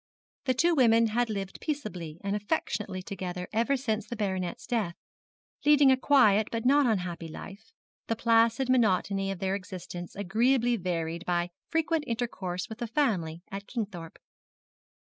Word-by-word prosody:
The 255 -2 +2
two 340 +7 +3
women 230 -5 +5
had 240 +2 +1
lived 195 -3 -4
peaceably 185 - -4
and 200 +1 -1
affectionately 205 -4 -2
together 180 -2 -5
ever 235 +5 +2
since 220 -5 -2
the 240 - -5
baronet's 190 -5 -2
death, 210 -7 -1 0.7
leading 290 -2 +6
a - - +6
quiet 220 -6 +4
but 230 0 -3
not 280 +1 +5
unhappy 180 -6 -1
life, 200 +7 -10 0.4
the 225 - 0
placid 230 +2 +3
monotony 200 -5 +2
of 195 - -3
their 190 +1 -1
existence 180 -2 -6
agreeably 235 +5 +2
varied 170 -3 -3
by 175 0 0 0.2
frequent 325 -1 +1
intercourse 195 -6 -3
with 220 +1 -9
the 240 - -3
family 185 - 0
at 200 +1 -6
Kingthorpe. 195 -9 -5
210 Hz, 145 wpm, -29 LUFS, 185-245 Hz, 0.7 s, leading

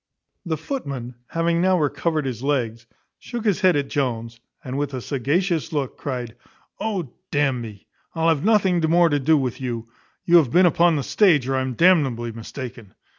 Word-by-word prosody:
The 160 -2 -1
footman, 140 - -5
having 170 0 0
now 185 0 +3
recovered 155 +1 -1
his 125 -3 -4
legs, 120 -5 -2 0.3
shook 235 -2 -6
his 210 -2 +1
head 185 -2 +4
at 140 -1 0
Jones, 115 -5 -3 0.2
and, 130 -2 -5
with 140 -1 -2
a - - -3
sagacious 160 +7 -1
look, 145 -5 -2
cried 125 -4 -5 0.4
"O 190 - -3 0.2
d 145 - -1
n 135 -4 +1
me, 105 -4 -10 0.3
I'll 165 0 +2
have 155 -3 +1
nothing 200 -5 +3
more 170 0 +5
to 145 -2 +1
do 155 +3 +3
with 130 -1 -2
you; 115 -3 -4 0.4
you 175 -1 +6
have 150 -7 +4
been 180 +8 +5
upon 170 0 +4
the 140 - -1
stage, 155 - +3
or 135 - 0
I'm 130 -1 -2
d 170 - +3
nably 130 -10 +3
mistaken." 115 -2 -9
145 Hz, 185 wpm, -22 LUFS, 125-170 Hz, 0.4 s, you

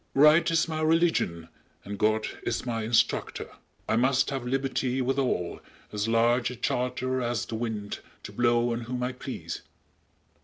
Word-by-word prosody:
Right 150 +4 +6
is 165 0 +2
my 155 -1 -2
religion 155 - +2 0.4
and 100 0 -6
God 110 0 +2 0.2
is - - -2
my 115 -2 -1
instructor! 110 +1 +1
_"I - - -6
must 130 +3 +3
have 135 -3 -3
liberty 130 -1 0
Withal, 130 -9 0 0.3
as 105 +1 -1
large 120 +2 +3
a 125 - -6
charter 125 +1 -1
as 120 -3 -1
the - - -8
wind 110 -3 -3 0.2
To - - -7
blow 120 0 +2
on 115 - -3
whom 125 +1 -3
I 125 - 0
please." 125 - -6
125 Hz, 155 wpm, -28 LUFS, 115-135 Hz, 0.4 s, Right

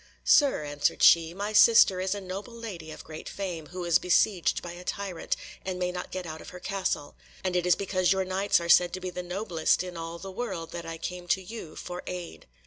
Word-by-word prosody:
"Sir," 275 - +4
answered 145 0 0
she, 165 -1 +7
"my 200 +4 -4
sister 210 -3 +7
is 190 +2 0
a 200 - -5
noble 195 +5 -7
lady 195 -9 -7
of - - -9
great 155 0 -8
fame, 175 -6 -5
who 180 0 -6
is 170 -2 +4
besieged 180 0 +2
by 175 - -6
a 175 +1 -9
tyrant, 190 -2 -3 0.3
and 185 -1 -3
may 180 0 -1
not 180 0 -5
get 185 -1 -5
out 160 -1 -7
of - - -10
her 180 - -10
castle. 185 -6 -2 0.3
And 185 -1 -1
it 180 0 +1
is 180 - +6
because 185 -2 +1
your 190 -1 +2
Knights 190 +1 +2
are 170 - -4
said 175 +1 +5
to 185 - -3
be 185 0 -5
the 180 - -4
noblest 180 -2 0
in 180 -1 -7
all 165 0 -5
the 190 +3 -8
world 190 -6 -4
that 170 -1 -6
I 165 0 -5
came 180 +2 -6
to 190 - +2
you 180 -5 -8
for 180 0 -6
aid." 175 - -7
180 Hz, 230 wpm, -28 LUFS, 170-190 Hz, 0.3 s, she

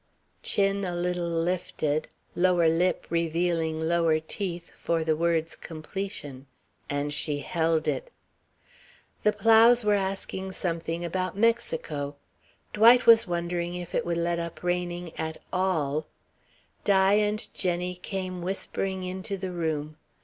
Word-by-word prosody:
chin 200 0 +1
a 180 -2 -2
little 175 0 -1
lifted, 165 -3 -1 0.3
lower 175 -2 +4
lip 170 +3 +1
revealing 165 -1 0
lower 165 -1 +2
teeth 170 +1 -5
for 165 -1 -1
the 160 -1 +2
word's 165 0 0
completion; 155 -5 -6 0.4
and 145 +1 -1
she 145 0 -1
held 160 -1 0
it. - - -1 1.1
The 210 - +4
Plows 225 +2 +5
were 210 - +4
asking 190 -1 -2
something 170 -1 -2
about 185 +2 -2
Mexico. 180 -11 0 0.6
Dwight 235 +4 +7
was 230 -1 +7
wondering 175 0 -2
if 175 -1 -6
it - - +1
would 170 -1 -1
let 170 0 0
up 170 0 -6
raining 175 -1 -2
at 160 0 -3 0.2
all. 155 -6 0 0.8
Di 195 -1 +4
and 210 0 +1
Jenny 180 -1 -1
came 185 0 -5
whispering 190 +1 -3
into 190 +2 -4
the 190 -1 -4
room. 155 -3 -3
175 Hz, 125 wpm, -27 LUFS, 165-190 Hz, 1.1 s, Dwight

